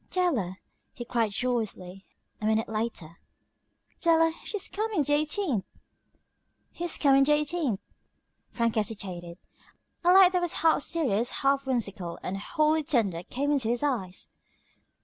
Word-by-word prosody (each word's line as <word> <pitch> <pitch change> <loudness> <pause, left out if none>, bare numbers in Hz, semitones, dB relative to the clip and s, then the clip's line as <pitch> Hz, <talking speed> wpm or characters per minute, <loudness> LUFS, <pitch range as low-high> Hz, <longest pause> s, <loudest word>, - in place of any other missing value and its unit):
"Della," 255 - 0 0.4
he 240 - -7
cried 230 -2 0
joyously, 200 -5 -3 0.3
a - - -3
minute 220 0 +1
later, 215 -7 -4 0.8
"Della, 325 -1 +3
she's 415 -3 -2
coming 425 -6 -1
the 290 - 0
eighteenth!" 300 - 0 1.2
"Who's 345 -1 +1
coming 275 -2 +5
the 295 +2 +3
eighteenth?" 295 - 0 0.7
Frank 230 -2 0
hesitated. 190 -5 -4 0.7
A 350 - +5
light 375 -1 +8
that 360 -1 +1
was 350 -1 -1
half 320 -2 +4
serious, 250 - +1
half 275 0 +2
whimsical, 200 -9 -2
and 195 +2 -3
wholly 310 +7 +1
tender, 220 - 0
came 280 +10 -2
into 265 -6 +1
his 240 +3 0
eyes. 210 -10 -3
250 Hz, 130 wpm, -27 LUFS, 205-310 Hz, 1.2 s, light